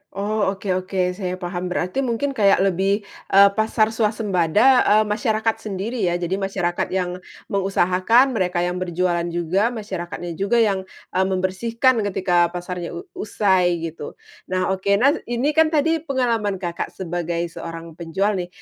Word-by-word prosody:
Oh, 200 Hz, 0 st, 0 dB
oke 195 Hz, 0 st, -4 dB
oke, 185 Hz, 0 st, 0 dB
saya 180 Hz, -1 st, -4 dB
paham. 180 Hz, 0 st, -4 dB
Berarti 180 Hz, +6 st, -2 dB
mungkin 265 Hz, +2 st, -1 dB
kayak 200 Hz, -6 st, +3 dB
lebih, 195 Hz, +2 st, +1 dB, 0.2 s
eee, 200 Hz, +1 st, +7 dB
pasar 220 Hz, 0 st, +2 dB
swasembada, 215 Hz, +1 st, +3 dB
eee, 215 Hz, +1 st, +5 dB
masyarakat 215 Hz, +1 st, 0 dB
sendiri 215 Hz, +4 st, -4 dB
ya 175 Hz, -, +1 dB
jadi 180 Hz, +2 st, -2 dB
masyarakat 195 Hz, -3 st, -1 dB
yang 180 Hz, -1 st, -2 dB, 0.3 s
mengusahakan 195 Hz, +6 st, +3 dB
mereka 180 Hz, -6 st, 0 dB
yang 180 Hz, +1 st, -2 dB
berjualan 175 Hz, -1 st, -1 dB
juga 175 Hz, +5 st, 0 dB
masyarakatnya 185 Hz, -7 st, -5 dB
juga 230 Hz, +4 st, +3 dB
yang, 195 Hz, -3 st, -1 dB, 0.2 s
eee, 190 Hz, +1 st, +1 dB
membersihkan 225 Hz, +7 st, +1 dB
ketika 180 Hz, -3 st, +2 dB
pasarnya 175 Hz, -1 st, -5 dB
u 170 Hz, -, -6 dB, 0.2 s
usai 185 Hz, -5 st, +1 dB
gitu. 165 Hz, -2 st, -6 dB, 0.3 s
Nah 185 Hz, 0 st, 0 dB
oke, 190 Hz, +1 st, +1 dB
nah 255 Hz, +7 st, +4 dB, 0.2 s
ini 240 Hz, +5 st, 0 dB
kan 320 Hz, +1 st, +4 dB
tadi 320 Hz, +1 st, +1 dB
pengalaman 240 Hz, -9 st, 0 dB
Kakak 175 Hz, -2 st, -4 dB
sebagai 170 Hz, -1 st, -3 dB
seorang 165 Hz, 0 st, -8 dB
penjual 170 Hz, +5 st, -1 dB
nih, 175 Hz, -, -4 dB
190 Hz, 150 wpm, -22 LUFS, 180-220 Hz, 0.3 s, eee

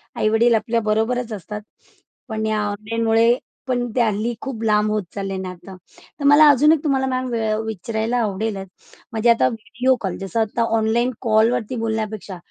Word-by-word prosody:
आई-वडील 225 Hz, +2 st, +3 dB
आपल्या 230 Hz, +1 st, 0 dB
बरोबरच 230 Hz, +2 st, 0 dB
असतात. 210 Hz, +1 st, -6 dB, 0.7 s
पण 220 Hz, -2 st, -3 dB
या 215 Hz, -1 st, 0 dB
ऑनलाईनमुळे 225 Hz, +3 st, +1 dB, 0.3 s
पण 245 Hz, -1 st, 0 dB
ते 250 Hz, -, +3 dB
हल्ली 220 Hz, +1 st, 0 dB
खूप 265 Hz, -5 st, -5 dB
लांब 210 Hz, -1 st, +2 dB
होत 215 Hz, -1 st, 0 dB
चालले 195 Hz, -1 st, -3 dB
नातं. 185 Hz, 0 st, -8 dB, 0.4 s
तर -, -, -5 dB
मला 290 Hz, +2 st, +7 dB
अजून 290 Hz, +2 st, +5 dB
एक 315 Hz, -2 st, +2 dB
तुम्हाला 270 Hz, -3 st, +1 dB
मॅम 255 Hz, 0 st, -1 dB
वेळ 220 Hz, -2 st, 0 dB
विचारायला 220 Hz, +3 st, -2 dB
आवडेलच 200 Hz, -1 st, -3 dB, 0.4 s
म्हणजे 225 Hz, +1 st, +1 dB
आता 230 Hz, -, +4 dB
व्हिडिओ 245 Hz, +3 st, 0 dB
कॉल, 190 Hz, -3 st, -3 dB
जसं 195 Hz, +4 st, -3 dB
आता 220 Hz, +2 st, 0 dB
ऑनलाईन 230 Hz, +3 st, +1 dB
कॉलवरती 230 Hz, +1 st, +2 dB
बोलण्यापेक्षा 215 Hz, -3 st, -3 dB
225 Hz, 160 wpm, -21 LUFS, 215-240 Hz, 0.7 s, मला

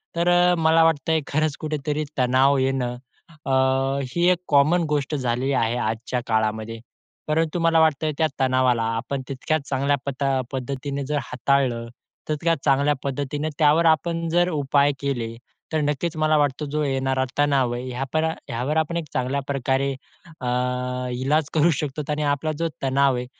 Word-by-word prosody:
तर 170 Hz, +1 st, 0 dB
अ, 175 Hz, 0 st, +4 dB
मला 165 Hz, 0 st, +4 dB
वाटतंय 160 Hz, 0 st, +2 dB
खरंच 155 Hz, 0 st, 0 dB
कुठेतरी 150 Hz, -1 st, -2 dB
तणाव 130 Hz, +2 st, +3 dB
येणं 130 Hz, -2 st, 0 dB, 0.5 s
अ, -, -, -2 dB, 0.6 s
ही 175 Hz, +4 st, +1 dB
एक 180 Hz, -, +1 dB
कॉमन 150 Hz, +5 st, +4 dB
गोष्ट 150 Hz, 0 st, -1 dB
झालेली 130 Hz, 0 st, -1 dB
आहे 115 Hz, -2 st, +1 dB
आजच्या 120 Hz, +1 st, -2 dB
काळामध्ये. 110 Hz, 0 st, -1 dB, 0.5 s
परंतु 160 Hz, +2 st, 0 dB
मला 165 Hz, -1 st, +3 dB
वाटतंय 155 Hz, -1 st, +2 dB
त्या 160 Hz, -, +3 dB
तणावाला 130 Hz, -3 st, +2 dB
आपण 130 Hz, +4 st, -3 dB
तितक्या 135 Hz, +3 st, -1 dB
चांगल्या 140 Hz, +1 st, 0 dB
पता 135 Hz, -1 st, 0 dB
पद्धतीने 140 Hz, +2 st, -4 dB
जर 150 Hz, +2 st, -1 dB
हाताळलं, 125 Hz, -2 st, 0 dB, 0.4 s
तितक्याच 165 Hz, +1 st, 0 dB
चांगल्या 140 Hz, +1 st, +3 dB
पद्धतीने 145 Hz, +2 st, -2 dB
त्यावर 155 Hz, +2 st, +4 dB
आपण 165 Hz, +1 st, +2 dB
जर 175 Hz, +2 st, +2 dB
उपाय 145 Hz, -2 st, +2 dB
केले, 120 Hz, -5 st, -3 dB, 0.4 s
तर 155 Hz, -, +2 dB
नक्कीच 150 Hz, +3 st, -1 dB
मला 155 Hz, 0 st, +3 dB
वाटतं 145 Hz, 0 st, 0 dB
जो 150 Hz, +1 st, -1 dB
येणारा 135 Hz, -1 st, 0 dB
तणाव 140 Hz, -4 st, +2 dB
आहे, 120 Hz, +1 st, -4 dB
ह्यापर 135 Hz, +5 st, -1 dB, 0.2 s
यावर 130 Hz, +7 st, -1 dB
आपण 160 Hz, +2 st, 0 dB
एक 170 Hz, -, -3 dB
चांगल्या 130 Hz, +2 st, -1 dB
प्रकारे 135 Hz, 0 st, 0 dB, 0.5 s
अ, 125 Hz, -, -3 dB, 0.7 s
इलाज 150 Hz, +3 st, +1 dB
करू 160 Hz, +2 st, +4 dB
शकतो 150 Hz, 0 st, -4 dB
आणि 150 Hz, 0 st, -1 dB
आपला 155 Hz, +2 st, -3 dB
जो 165 Hz, -, +1 dB, 0.2 s
तणाव 135 Hz, 0 st, +3 dB
आहे, 125 Hz, 0 st, -3 dB
140 Hz, 155 wpm, -23 LUFS, 130-155 Hz, 0.7 s, अ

